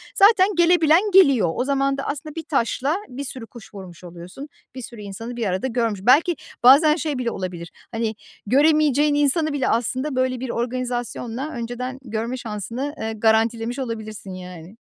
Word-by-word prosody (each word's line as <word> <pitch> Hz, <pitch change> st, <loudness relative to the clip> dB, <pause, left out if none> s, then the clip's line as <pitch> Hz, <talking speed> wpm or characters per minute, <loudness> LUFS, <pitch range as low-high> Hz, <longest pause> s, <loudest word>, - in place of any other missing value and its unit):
zaten 395 Hz, -2 st, +6 dB
gelebilen 340 Hz, -1 st, +5 dB
geliyor. 275 Hz, -, +5 dB
O -, -, 0 dB
zaman 275 Hz, 0 st, 0 dB
da 275 Hz, -, -4 dB
aslında 295 Hz, +1 st, -5 dB
1 325 Hz, -, -5 dB
taşla 275 Hz, +2 st, 0 dB
bir 260 Hz, +3 st, -7 dB
sürü 255 Hz, -3 st, -8 dB
kuş 235 Hz, -3 st, -14 dB
vurmuş 185 Hz, -3 st, -11 dB
oluyorsun, 180 Hz, -, -10 dB, 0.3 s
bir 260 Hz, -, -6 dB
sürü 235 Hz, -2 st, -10 dB
insanı 215 Hz, +4 st, -7 dB
bir 235 Hz, -2 st, -2 dB
arada 190 Hz, +5 st, -1 dB
görmüş. 230 Hz, -5 st, -1 dB
Belki 300 Hz, -, +4 dB, 0.3 s
bazen 295 Hz, +5 st, +7 dB
şey 305 Hz, -4 st, -3 dB
bile 245 Hz, -2 st, -2 dB
olabilir, 180 Hz, -3 st, -6 dB, 0.2 s
hani, 225 Hz, -1 st, -2 dB, 0.3 s
göremeyeceğin 295 Hz, +3 st, +3 dB
insanı 295 Hz, +2 st, +1 dB
bile 280 Hz, -3 st, -1 dB
aslında 255 Hz, +5 st, -1 dB
böyle 255 Hz, -1 st, 0 dB
bir 260 Hz, 0 st, -5 dB
organizasyonla 245 Hz, +2 st, -3 dB
önceden 245 Hz, +2 st, -5 dB
görme 230 Hz, +1 st, -4 dB
şansını, 235 Hz, +5 st, -5 dB
eee, 220 Hz, 0 st, -3 dB
garantilemiş 225 Hz, +3 st, +1 dB
olabilirsin, 215 Hz, -5 st, -6 dB
yani. 180 Hz, +1 st, -10 dB
245 Hz, 160 wpm, -22 LUFS, 220-280 Hz, 0.3 s, bazen